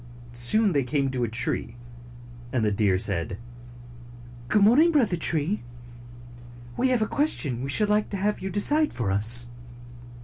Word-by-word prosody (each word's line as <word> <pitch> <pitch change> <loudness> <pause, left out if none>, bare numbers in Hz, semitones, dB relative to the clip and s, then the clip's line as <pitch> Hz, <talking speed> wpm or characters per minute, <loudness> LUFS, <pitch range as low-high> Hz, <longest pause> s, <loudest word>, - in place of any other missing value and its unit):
Soon 160 - +2
they 140 -4 0
came 135 +1 -2
to 125 -2 -3
a - - 0
tree, 115 +1 -1 0.8
and 120 -3 -1
the 105 - 0
deer 100 -2 +1
said, 95 -3 -2 1.1
"Good 200 - +2
morning, 285 +11 +4
Brother 240 - +1
Tree. 165 +3 -1 1.1
We 260 - +1
have 245 -4 +1
a - - -3
ques 295 +6 0
tion 125 -6 -4
we 135 - -5
should 210 +10 +3
like 210 0 0
to 200 - -4
have 205 +2 -2
you 190 - -5
decide 290 - +2
for 115 -6 -3
us." 115 +5 +4
145 Hz, 165 wpm, -24 LUFS, -, 1.1 s, morning